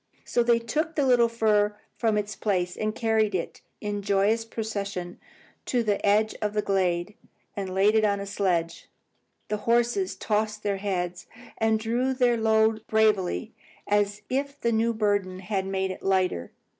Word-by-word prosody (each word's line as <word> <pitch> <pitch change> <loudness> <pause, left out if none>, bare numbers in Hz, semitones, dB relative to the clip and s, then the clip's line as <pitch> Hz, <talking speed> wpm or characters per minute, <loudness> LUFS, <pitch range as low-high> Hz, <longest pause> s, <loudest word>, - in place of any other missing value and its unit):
So 240 - +1
they 235 0 +4
took 305 +8 -2
the 285 - +2
little 245 -2 +4
fir 210 -2 +2 0.2
from 220 -3 +1
its 210 +1 -2
place, 180 -4 -1
and 215 0 -2
carried 220 -3 +1
it 170 - -4 0.2
in 205 -1 -3
joyous 200 +3 +2
procession 200 -5 -4 0.5
to 245 -2 +1
the 205 -2 0
edge 215 +2 +3
of 210 -1 -1
the 210 -1 0
glade, 185 -1 0 0.4
and 195 -2 -4
laid 200 +2 +4
it 220 0 +3
on 205 -1 +2
the 200 - -5
sledge. 180 -4 -1 0.6
The 210 - 0
horses 240 - +1
tossed 215 0 -1
their 200 -1 0
heads 180 -3 -3 0.3
and 220 0 +2
drew 245 +4 0
their 245 -2 +3
load 220 -1 +2
bravely, 210 - +1 0.3
as 205 0 +1
if 280 +2 -2
the 235 - +1
new 225 +1 +2
burden 205 -4 0
had 195 -1 -2
made 190 0 -1
it 185 - -8
lighter. 185 - 0
210 Hz, 165 wpm, -26 LUFS, 195-225 Hz, 0.6 s, they